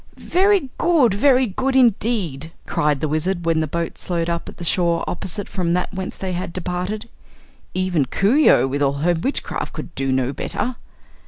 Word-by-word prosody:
"Very 375 -6 +2
good 310 - +4
very 260 +4 +4
good 260 +6 -1
indeed!" 210 - +1
cried 150 -2 0
the 155 - +1
Wizard, 170 +4 -1
when 165 -1 +2
the 155 - 0
boat 170 +2 -3
slowed 170 -1 -2
up 170 0 -3
at - - -12
the 175 - -7
shore 170 -1 +1
opposite 190 +3 -4
from 175 -3 -1
that 180 0 -1
whence 190 -1 -5
they 190 -1 -3
had 175 -1 -4
departed. 185 +5 -3 0.7
"Even 185 -6 +1
Coo 200 - +2
ee 305 - +6
oh, - - +5
with 140 +2 -2
all 140 -1 +3
her 175 - +4
witchcraft, 180 - -3
could - - -7
do 135 0 -1
no 130 0 0
better." 250 - -3
180 Hz, 185 wpm, -21 LUFS, 165-225 Hz, 0.7 s, ee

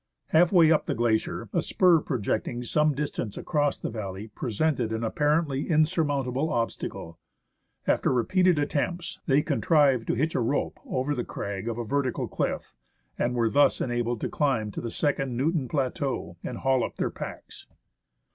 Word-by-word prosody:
Half 170 +2 +4
way 165 -4 +6
up 155 - +2
the - - 0
glacier, 115 -1 0
a - - +2
spur 180 -3 +4
projecting 120 -1 -2
some 150 +4 +2
distance 140 -7 -3
across 145 -3 0
the - - -4
valley 105 -2 -5
presented 120 +2 -1
an 110 +1 -2
apparently 150 +4 0
insurmountable 150 -3 +1
obstacle. 110 - -3 0.7
After - - +2
repeated 180 +8 +3
attempts, 170 +5 -2
they 145 0 +4
contrived 140 -7 +3
to - - +1
hitch 155 +7 0
a - - 0
rope 120 +4 -1
over 130 +3 -1
the 125 -4 -2
crag 100 -1 -5
of 115 -1 -2
a 120 - -3
vertical 135 +1 -1
cliff, - - -3 0.5
and 125 +1 0
were 115 -1 +2
thus 145 0 +4
enabled 120 -2 -1
to - - -1
climb 125 -8 0
to - - -5
the 115 - -4
second 135 -2 -1
Newton 145 0 0
plateau 130 - -2
and 125 - -5
haul 130 -2 +2
up - - -5
their - - -1
packs. - - -9
135 Hz, 165 wpm, -27 LUFS, 120-150 Hz, 0.7 s, way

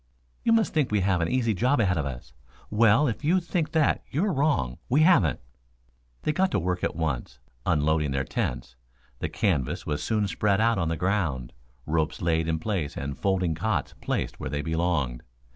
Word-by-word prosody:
"You - - +2
must 225 -2 +3
think 150 -7 +1
we 105 -2 +2
have 95 -2 +1
an 80 - +1
easy 120 -1 +1
job 125 +8 +2
ahead 95 -5 +2
of 70 - -1
us. - - -8 0.4
Well, 115 +6 +4
if 115 +3 -3
you 175 +5 +3
think 170 -2 -2
that 155 -3 +2
you're 185 +8 0
wrong; 135 - 0
we 140 +5 +4
haven't." 130 - +4 0.8
They - - +1
got 190 +4 +2
to - - +2
work 90 0 -2
at - - -1
once, 70 -7 -3 0.3
unloading 75 -2 +2
their 65 0 0
tents. - - -3 0.4
The - - -2
canvas 80 - -1
was 75 -1 -2
soon 105 -2 0
spread 100 0 +1
out 115 -2 +3
on 85 - 0
the 80 - -1
ground, 80 -10 -1 0.3
ropes 80 0 -1
laid 80 -1 +1
in 80 -1 0
place 85 -4 -3
and 70 0 -4
folding 95 -4 0
cots 90 +1 -1
placed - - -2
where - - -4
they 75 +1 -2
belonged. 80 -7 -1
90 Hz, 190 wpm, -26 LUFS, 75-115 Hz, 0.8 s, Well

